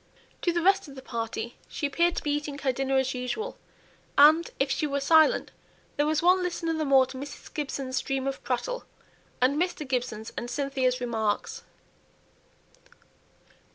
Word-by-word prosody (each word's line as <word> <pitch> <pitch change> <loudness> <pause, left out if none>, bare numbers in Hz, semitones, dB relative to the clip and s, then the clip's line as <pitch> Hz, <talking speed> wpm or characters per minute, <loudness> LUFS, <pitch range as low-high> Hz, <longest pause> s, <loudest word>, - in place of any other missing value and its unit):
To 350 - +2
the 340 0 -1
rest 390 -1 +3
of 275 - -11
the 265 - -10
party 230 -1 -4
she - - -4
appeared 340 +4 +2
to - - -3
be 295 - 0
eating 290 -1 -2
her 275 -2 0
dinner 270 +1 0
as 265 0 +1
usual, 265 - -4 0.6
and, 310 +4 +7
if 270 0 +1
she 300 - 0
were 280 0 -1
silent, 315 +2 +4 0.4
there 290 +1 +1
was 310 +1 +1
one 365 +1 +5
listener 345 -2 -1
the 315 -1 -1
more 270 -2 +6
to 260 0 -9
Mrs. 285 +1 -9
Gibson's 275 -4 -3
stream 270 0 -1
of 275 0 -3
prattle, - - -2 0.6
and 280 +5 +3
Mr. 350 -5 -2
Gibson's 245 -4 -2
and 240 - -4
Cynthia's 260 -2 0
remarks. 220 -4 -1
275 Hz, 165 wpm, -27 LUFS, 255-315 Hz, 0.6 s, and